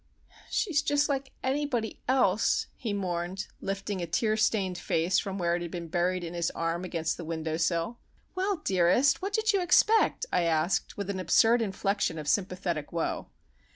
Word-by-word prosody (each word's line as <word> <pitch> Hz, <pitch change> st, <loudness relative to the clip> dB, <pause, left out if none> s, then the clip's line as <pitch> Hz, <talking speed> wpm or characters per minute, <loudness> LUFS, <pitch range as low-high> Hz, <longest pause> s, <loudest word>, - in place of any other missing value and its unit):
"She's 330 Hz, -8 st, +1 dB
just 290 Hz, 0 st, +1 dB
like 270 Hz, -1 st, -2 dB
anybody 260 Hz, -4 st, -1 dB
else," 245 Hz, -6 st, +2 dB
he 230 Hz, -, -4 dB
mourned, 185 Hz, -1 st, -2 dB, 0.2 s
lifting 195 Hz, 0 st, -3 dB
a 170 Hz, -, -3 dB
tear 215 Hz, +6 st, +1 dB
stained 200 Hz, -5 st, +1 dB
face 165 Hz, +2 st, +1 dB
from 195 Hz, -1 st, -4 dB
where 170 Hz, -2 st, +1 dB
it 175 Hz, -, -3 dB
had 170 Hz, -, -4 dB
been 170 Hz, -1 st, -6 dB
buried 180 Hz, +2 st, 0 dB
in 170 Hz, 0 st, -5 dB
his 170 Hz, -1 st, 0 dB
arm 165 Hz, +1 st, -1 dB
against 165 Hz, -3 st, -2 dB
the 175 Hz, -, -6 dB
window 160 Hz, -1 st, -3 dB
sill. 170 Hz, +7 st, -1 dB, 0.3 s
"Well, 385 Hz, +2 st, 0 dB
dearest, 190 Hz, -, +3 dB
what 395 Hz, +2 st, -3 dB
did 440 Hz, 0 st, +2 dB
you 395 Hz, -, +2 dB
expect?" 430 Hz, +7 st, +4 dB
I -, -, +3 dB
asked, 165 Hz, +1 st, 0 dB
with 200 Hz, -1 st, -2 dB
an 190 Hz, -, -4 dB
absurd 225 Hz, +7 st, +4 dB
inflection 195 Hz, -4 st, -1 dB
of 150 Hz, -2 st, -6 dB
sympathetic 180 Hz, -5 st, -1 dB
woe. 170 Hz, -1 st, -2 dB
190 Hz, 175 wpm, -28 LUFS, 170-240 Hz, 0.3 s, expect